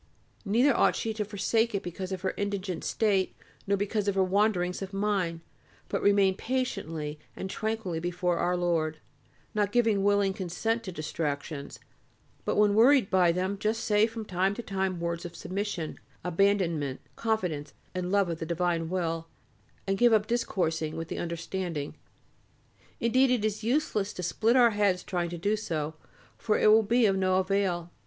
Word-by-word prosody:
Neither 240 +7 +3
ought - - +3
she 225 - -2
to 215 -1 -2
forsake 215 +2 0
it 195 - -2
because 185 +2 -5
of 185 -2 -3
her 190 - -1
indigent 200 -4 -3
state 200 -4 +1 0.3
nor 200 0 +2
because 205 +1 -1
of 200 - +1
her 190 - +4
wanderings 185 -2 +1
of 195 0 -6
mind, 195 -5 0 0.5
but - - -1
remain 200 -2 +4
patiently 165 - -3 0.2
and 190 - -5
tranquilly 220 -7 -2
before 175 0 -1
Our 180 +1 +1
Lord, 165 -3 0 0.6
not 205 -1 +1
giving 225 -4 +2
willing 200 -1 +3
consent 205 +4 -2
to 185 - -4
distractions, 150 -2 -4 0.7
but - - 0
when 210 -1 +4
worried 240 +1 +5
by 180 -2 +5
them 185 +3 -2
just 220 +2 -1
say 210 -1 +3
from 225 -1 -7
time 190 +1 0
to 235 - -6
time 190 -3 -2
words 170 0 -2
of 175 -1 -8
submission, 185 -3 -4 0.2
abandonment, 170 -6 +1 0.2
confidence, 180 -10 -2 0.2
and 180 0 -3
love 200 -2 +3
of 165 -1 -4
the 165 - -3
divine 170 -1 0
will, 165 -2 -2 0.6
and 195 0 -1
give 240 -1 +5
up 210 -1 +4
discoursing 170 -9 -1
with 165 0 -5
the - - -4
understanding; 170 -2 -4 1.1
indeed 255 +3 +3
it 245 -4 +1
is 215 0 -2
useless 225 -5 0
to 180 - -6
split 225 +7 +2
our 240 -2 +6
heads 200 -3 +1
trying 175 -2 -2
to 175 - -5
do 205 +6 +1
so, 160 -7 -3 0.5
for 215 -2 +1
it 215 - +5
will 220 +1 +7
be 230 +3 +3
of 195 -2 +3
no 185 -1 +2
avail. 185 -2 0
190 Hz, 170 wpm, -28 LUFS, 175-210 Hz, 1.1 s, will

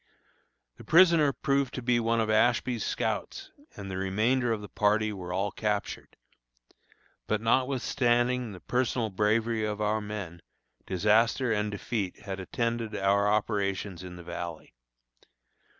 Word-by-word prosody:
The - - -12
prisoner 165 -4 +5
proved 140 -1 0
to 130 - -5
be 120 0 +2
one 115 0 +1
of 110 - +1
Ashby's 120 +2 +2
scouts, 390 -1 -3 0.2
and 100 -1 -7
the 95 - -4
remainder 110 +6 +1
of 110 -2 -1
the 105 - -8
party 105 +1 +1
were 90 -3 -7
all 95 +3 -1
captured. 105 -1 -3 1.1
But 110 - +1
notwithstanding 125 0 +1
the 90 - -11
personal 125 -3 -1
bravery 110 +3 +1
of 105 -1 -2
our 105 +1 0
men, 100 -5 -6 0.5
disaster 110 +6 +2
and 105 0 0
defeat 105 -1 -4
had 95 -1 -6
attended 115 +2 -2
our 100 0 +2
operations 100 -3 -1
in 90 -1 -8
the 90 - -10
Valley. 85 -3 -7
110 Hz, 135 wpm, -28 LUFS, 100-120 Hz, 1.1 s, prisoner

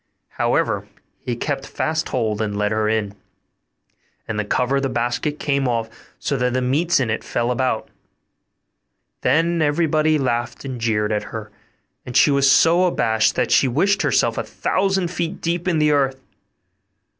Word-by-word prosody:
However, - - 0 0.3
he 120 - -4
kept 135 +2 -3
fast 160 +1 -2
hold, 110 -1 -1
and 105 -2 -2
led 105 0 0
her 110 0 +1
in; 110 -2 -1 1.1
and 105 -1 -3
the - - 0
cover 125 +6 0
of - - 0
the 135 - -1
basket 125 +4 -2
came 140 -3 0
off, 115 -2 -1 0.3
so 140 - -2
that 125 -1 0
the 130 - 0
meats 150 +7 +2
in 120 -5 0
it 110 - -2
fell 120 +1 -1
about. 125 -2 -1 1.3
Then 165 +5 +2
everybody 155 0 +2
laughed 120 -2 -2
and 130 -3 -5
jeered 105 -2 0
at 105 -1 -1
her; 110 -2 -7 0.5
and 125 0 -2
she 145 - +5
was 140 -1 +4
so 165 +6 +5
abashed, 110 -10 +1
that - - 0
she 135 - +4
wished 195 +11 +1
herself - - +1
a - - -1
thousand 190 -2 -1
feet 175 +1 -3
deep 170 +2 -2
in 175 -3 +2
the 150 -1 +3
earth. 135 -2 +1
130 Hz, 170 wpm, -21 LUFS, 115-155 Hz, 1.3 s, she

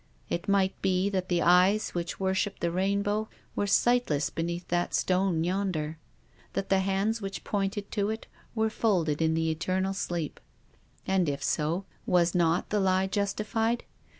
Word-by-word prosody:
It 170 +4 -2
might 195 -1 +3
be 190 +1 +1
that 185 -2 -2
the 175 -1 +2
eyes 185 +5 +4
which 175 0 -4
worshipped 190 +1 -1
the 170 - +1
rainbow 200 +4 0 0.3
were 205 - 0
sightless 235 -10 +2
be 165 - -3
neath 170 +1 -3
that 175 0 0
stone 185 -3 +1
yonder; 175 -4 -1 0.5
that 195 - -2
the 195 - +4
hands 195 +4 0
which 195 0 -5
pointed 200 0 -2
to 205 -1 0
it 220 +1 -4 0.3
were 220 -1 +1
folded 170 -10 +1
in 160 0 +2
the 160 0 +1
eternal 185 +4 -1
sleep. 175 -5 -3 0.7
THE - - -3
RAINBOW. 190 - +3
49 - - +4
And, 175 -4 +2
if 140 -1 -3
so, 165 +5 0 0.2
was 175 -1 +3
not 170 0 +1
the 210 - +2
lie 190 -1 +2
justified? 215 +4 -1
190 Hz, 175 wpm, -28 LUFS, 170-200 Hz, 0.7 s, eyes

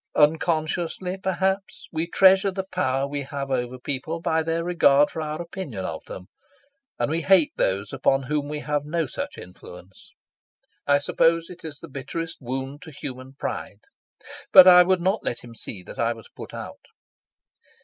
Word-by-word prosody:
Unconsciously, 160 +3 +1
perhaps, 190 0 -2
we 160 +1 -2
treasure 190 +2 +5
the 190 0 -3
power 135 -6 0
we 145 0 -3
have 140 0 -5
over 125 -1 -1
people 140 +6 -4
by 165 -1 +1
their 165 +1 -1
regard 150 -5 +4
for 160 - -4
our 155 0 -4
opinion 170 - -6
of - - -5
them, 90 - -9 0.7
and 150 - -1
we 165 +1 0
hate 180 -3 +4
those 100 +3 -1
upon 135 +1 +2
whom 145 +2 -2
we 150 0 -4
have 150 -1 -1
no 165 +2 -1
such - - -6
influence. 90 +1 -13 0.8
I 145 0 +5
suppose 165 +4 +1
it 180 - -12
is 155 -3 -7
the 165 - -11
bitterest 150 +4 -6
wound 135 +3 -5
to 160 - -10
human 130 -2 -8
pride. 105 -6 -5 0.7
But 185 - +10
I 180 -1 +10
would 180 0 +2
not 190 +4 0
let 120 - -3
him 120 -1 -12
see 100 -4 -8
that - - -11
I 115 0 +1
was 115 -1 -14
put - - -9
out. - - -9
150 Hz, 170 wpm, -24 LUFS, 135-170 Hz, 0.8 s, But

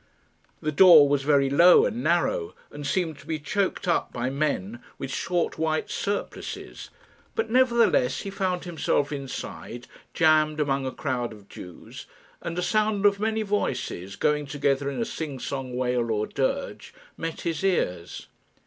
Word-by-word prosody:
The 155 - 0
door 160 -2 +8
was 140 -1 +1
very 140 -1 +3
low 170 +6 +6
and 240 0 -3
narrow, 470 -4 0 0.2
and 145 -1 -6
seemed 165 -5 -1
to - - -16
be 160 - -1
choked 185 +6 -2
up 170 - +1
by 125 +2 -2
men 120 -6 -2 0.2
with 135 - -5
short 175 +4 -1
white 160 -1 -1
surplices, 200 0 -4 0.5
but 455 - -1
nevertheless 235 - +3
he 195 - -6
found 185 -2 -2
himself 160 -4 -1
inside, 135 -3 -6 0.3
jammed 155 -1 +3
among 135 -2 0
a - - -2
crowd 125 -5 -3
of 105 -2 -14
Jews; 90 -2 -11 0.3
and 170 0 -5
a 180 - 0
sound 215 -1 +1
of 200 -1 +4
many 220 +1 0
voices, 100 - -2
going 150 -1 0
together 140 0 0
in 140 - -4
a 230 - 0
sing 155 -9 -5
song 130 -1 -5
wail 125 -2 0
or 105 -1 0
dirge, 135 -2 -3 0.2
met 165 0 -5
his 165 +1 -3
ears. 90 - -1
150 Hz, 160 wpm, -26 LUFS, 135-185 Hz, 0.5 s, door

